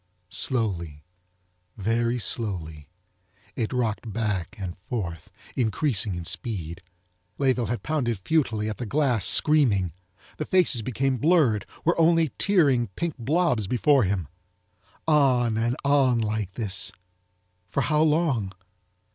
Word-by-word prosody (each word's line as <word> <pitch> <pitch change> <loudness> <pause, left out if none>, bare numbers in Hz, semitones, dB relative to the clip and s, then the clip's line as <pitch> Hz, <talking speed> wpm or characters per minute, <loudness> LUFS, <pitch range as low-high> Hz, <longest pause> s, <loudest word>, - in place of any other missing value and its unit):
Slowly, 85 - -1 0.7
very 115 +4 0
slowly, 85 - -3 0.7
it 110 - -2
rocked 115 -3 -2
back 105 -5 -2
and 95 -4 -5
forth, 85 -9 -4 0.3
increasing 110 - 0
in 85 -1 -6
speed. 90 -4 -4 0.6
Layeville 130 -4 +1
had 120 - -3
pounded 135 -7 -1
futilely 110 - 0
at 110 - -4
the 120 - -5
glass, 125 -6 +1
screaming. 110 - +3 0.4
The 155 - -3
faces 175 -10 +3
became 130 +3 -1
blurred, 135 - +2 0.2
were 170 +1 +2
only 165 -1 +4
tearing 145 - +3
pink 170 -3 -2
blobs 135 - +1
before 135 +3 +3
him. 95 -4 -1 0.8
On 130 -7 +3
and 115 +2 0
on 140 -3 +3
like 110 -4 -2
this—for 90 -3 -5
how 150 0 +1
long? 150 - +1
115 Hz, 115 wpm, -25 LUFS, 95-140 Hz, 0.8 s, only